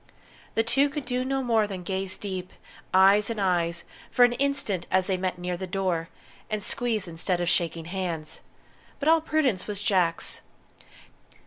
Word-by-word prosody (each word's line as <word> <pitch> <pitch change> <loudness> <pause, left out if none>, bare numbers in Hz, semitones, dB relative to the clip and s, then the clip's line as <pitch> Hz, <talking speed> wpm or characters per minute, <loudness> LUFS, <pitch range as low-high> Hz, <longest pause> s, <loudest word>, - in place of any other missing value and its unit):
The 225 - +3
two 275 +5 +3
could 290 -2 -5
do 250 0 -1
no 270 +1 -1
more 225 -3 +3
than 190 -3 -6
gaze 190 +1 -3
deep, 185 -3 -5 0.4
eyes 195 +3 +6
in 230 - -3
eyes, 175 -3 +1 0.3
for 245 - +6
an 245 - +1
instant, 265 -8 -1
as 185 0 +3
they 190 -1 0
met 185 0 -2
near 180 0 -3
the 190 +2 -5
door, 180 -3 -1 0.4
and 215 -2 -2
squeeze 225 -4 -1
instead 175 +2 -1
of 175 - -1
shaking 165 -1 0
hands; 170 -4 -4 0.6
but 290 - -2
all 325 0 +6
prudence 290 -11 +1
was 205 -2 -3
Jack's. 185 -5 0
190 Hz, 165 wpm, -27 LUFS, 180-240 Hz, 0.6 s, eyes